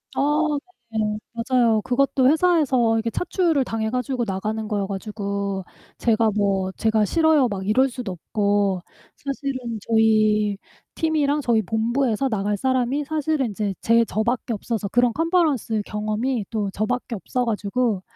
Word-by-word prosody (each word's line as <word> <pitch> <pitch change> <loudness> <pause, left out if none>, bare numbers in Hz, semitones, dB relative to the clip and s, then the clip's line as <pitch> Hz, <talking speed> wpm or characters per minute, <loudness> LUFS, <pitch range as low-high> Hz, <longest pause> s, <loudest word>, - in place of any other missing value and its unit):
아 - - +1 0.7
네. 220 - -4 0.4
맞아요. 230 -2 +2
그것도 260 +1 +2
회사에서 285 -9 +3
이게 225 0 -1
차출을 340 -6 +1
당해 220 -2 -2
가지고 250 0 -1
나가는 215 +3 -3
거여 205 -2 -1
가지고 200 -1 -3 0.4
제가 225 -1 +2
뭐 195 -2 +1
제가 220 -1 +2
"싫어요." 315 -2 +3
막 195 -2 -4
이럴 260 +5 +3
수도 235 -6 -5
없고 200 0 0 0.3
사실은 265 -4 -4
저희 215 -2 +3 0.4
팀이랑 300 -2 +1
저희 230 -4 +2
본부에서 230 +4 0
나갈 205 -3 -1
사람이 260 +4 0
사실은 305 -3 0
인제 205 -2 -3
제 230 0 +4
저밖에 235 +3 -1
없어서 215 0 -3
그런 245 +2 +2
컨퍼런스 310 - +1
경험이 215 +2 -2
또 210 -4 -2
저 215 +1 -1
밖에 250 -1 -2
없어 245 +4 -2
가지고 210 -1 -1
225 Hz, 310 characters per minute, -23 LUFS, 210-260 Hz, 0.7 s, 제